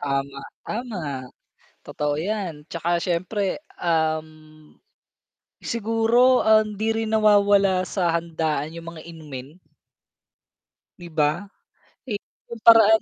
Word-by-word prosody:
Tama, 140 0 -2 0.2
tama, 230 -3 -4 0.8
totoo 150 -1 -2
'yan, 170 -3 -3
'tsaka 170 +1 0
siyempre, 185 +5 -1 0.2
um, 160 -2 0 1.4
siguro, 230 +3 +3
ah, 220 0 +6
hindi 215 +1 -2
rin 225 0 -2
nawawala 200 -3 +4
sa 175 -4 0
handaan 160 -3 -1
yung 170 0 -8
mga 160 0 -11
inumin. 150 -2 -9 1.4
'Di 175 - -10
ba? 155 +4 +1 0.6
Eh, 210 -4 -3 0.3
yung 230 -1 -7
paraan 220 -1 +7
180 Hz, 100 wpm, -23 LUFS, 160-215 Hz, 1.4 s, paraan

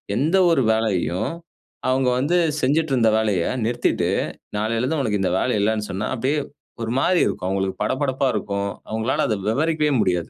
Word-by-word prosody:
எந்த 155 - +2
ஒரு 160 - +3
வேலையையும் 95 -5 0 0.6
அவுங்க 130 0 +2
வந்து 155 +7 +1 0.2
செஞ்சுட்டு 150 +3 +1
இருந்த 115 -4 +4
வேலைய 105 -6 +1 0.2
நிறுத்திட்டு, 120 +1 0 0.5
நாளையில 110 +2 0
இருந்து 145 +5 0
உனக்கு 105 -6 0
இந்த 95 - +1
வேலை 125 - 0
இல்லன்னு 105 0 0
சொன்னா, 100 +4 -2
அப்டியே 135 +5 0 0.4
ஒரு 115 - -3
மாரி 180 +5 +3
இருக்கும். 90 - -3
அவுங்களுக்கு 95 0 -2
படபடப்பா 130 +3 0
இருக்கும். 100 0 -2 0.2
அவுங்களால 110 +4 0
அதை 110 - 0
விவரிக்கவே 155 +3 +1
முடியாது. 90 -4 0
115 Hz, 155 wpm, -22 LUFS, 105-135 Hz, 0.6 s, இருந்த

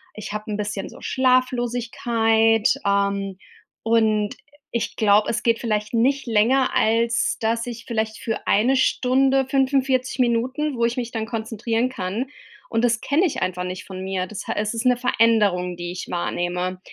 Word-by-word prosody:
Ich 215 -1 -7
habe 210 +1 -5
'n 205 - -2
bisschen 205 -1 -4
so - - -13
Schlaflosigkeit, 240 -3 +2
ähm, 200 -1 0 0.5
und 220 -2 +2 0.4
ich 235 - -2
glaube, 210 -1 +4
es 235 - -1
geht 230 -1 +3
vielleicht 215 0 -2
nicht 265 +4 +1
länger, 235 +4 +3
als 230 +1 +2
dass 230 +1 0
ich 235 -1 -7
vielleicht 220 -1 -2
für 225 - -4
eine 240 +6 +3
Stunde, 265 +1 +2
45 265 -2 +1
Minuten, 255 +5 0
wo 235 - +2
ich 235 +2 -1
mich 240 -2 -2
dann 220 -1 -3
konzentrieren 225 +1 -2
kann 220 +1 -3 0.4
und 225 - 0
das 235 -1 +1
kenne 305 +7 +2
ich 330 - -2
einfach 185 -1 -1
nicht 185 +1 -6
von 185 -1 -8
mir. 190 -1 -2
Das 215 - -8
ha - - -1
es 210 +1 -1
ist 230 - -3
eine 250 -1 +4
Veränderung, 210 -7 +2
die 175 0 -5
ich 180 - -7
wahrnehme. 180 +1 -2
225 Hz, 165 wpm, -22 LUFS, 205-245 Hz, 0.5 s, glaube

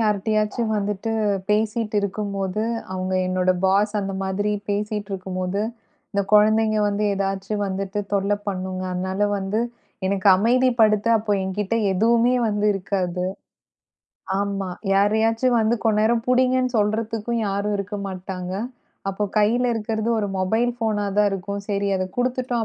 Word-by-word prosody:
யார்ட்டயாச்சும் 215 +1 0
வந்துட்டு 205 +2 -2 0.4
பேசிட்டு 215 0 0
இருக்கும்போது 200 0 -2 0.3
அவுங்க 185 0 -2
என்னோட 185 0 +1
பாஸ் 200 +2 +3
அந்த 195 -1 -3
மாதிரி 195 +2 -1 0.2
பேசிட்டு 210 0 -2
இருக்கும்போது, 185 +1 -3 0.5
இந்தக் 200 -1 -2
கொழந்தைங்க 215 +1 +4
வந்து 205 +1 -1
எதாச்சும் 195 +1 -2
வந்துட்டு 195 +1 -3
தொல்ல 200 +1 +2
பண்ணுங்க. 185 -1 -3
அதனால 190 +3 0
வந்து 195 +3 -1 0.5
எனக்கு 195 0 +2
அமைதி 250 +6 +3
படுத்த 215 0 +4
அப்போ 210 -1 -1
என்கிட்ட 205 +3 -2 0.2
எதுவுமே 230 +5 +3
வந்து 210 0 0
இருக்காது. 185 -2 -2 1.1
ஆமா. 200 -2 -2 0.2
யாரையாச்சும் 225 +4 +3
வந்து 220 +2 +2
கொஞ்ச 215 -1 +3
நேரம் 225 +1 +2
புடிங்கன்னு 255 0 +2
சொல்றதுக்கும் 220 +2 -1
யாரும் 200 +1 -1
இருக்க 205 +1 -4
மாட்டாங்க. 185 -1 -6 0.6
அப்ப 205 +2 -2
கைல 230 +4 +3
இருக்குறது 220 0 -2
ஒரு 205 - 0
மொபைல் 225 +6 +1
ஃபோனா 215 -3 0
தான் 210 - +5
இருக்கும். 200 +1 -4
சரி 200 0 0
அதக் 185 0 -4
குடுத்துட்டோம் 245 -1 0
205 Hz, 130 wpm, -23 LUFS, 195-220 Hz, 1.1 s, தான்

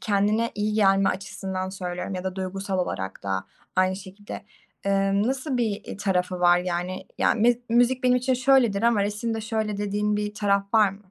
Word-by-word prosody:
kendine 210 +3 +1
iyi 210 +1 -1
gelme 195 -2 +4
açısından 190 -1 -4
söylüyorum 180 0 -5
ya 185 0 -5
da 185 0 -3
duygusal 190 0 -3
olarak 95 - -3
da 95 -1 -2 0.3
aynı 185 0 +3
şekilde, 200 +1 -9 0.4
eee, 195 0 +2
nasıl 260 +3 -1
bir, 220 -4 -1
iii, - - -7
tarafı 180 -3 -1
var? 175 0 +5
Yani, 180 +1 -3
ya, - - +3
miz 235 +1 +3
müzik 245 +2 +3
benim 250 0 +5
için 255 +1 +1
şöyledir 250 -5 +3
ama 230 -3 +3
resimde 220 +2 -2
şöyle 220 -2 -2
dediğin 205 +1 0
bir 210 0 -3
taraf 200 0 0
var 210 -3 +5
mı 195 -1 -16
200 Hz, 180 wpm, -25 LUFS, 190-220 Hz, 0.4 s, var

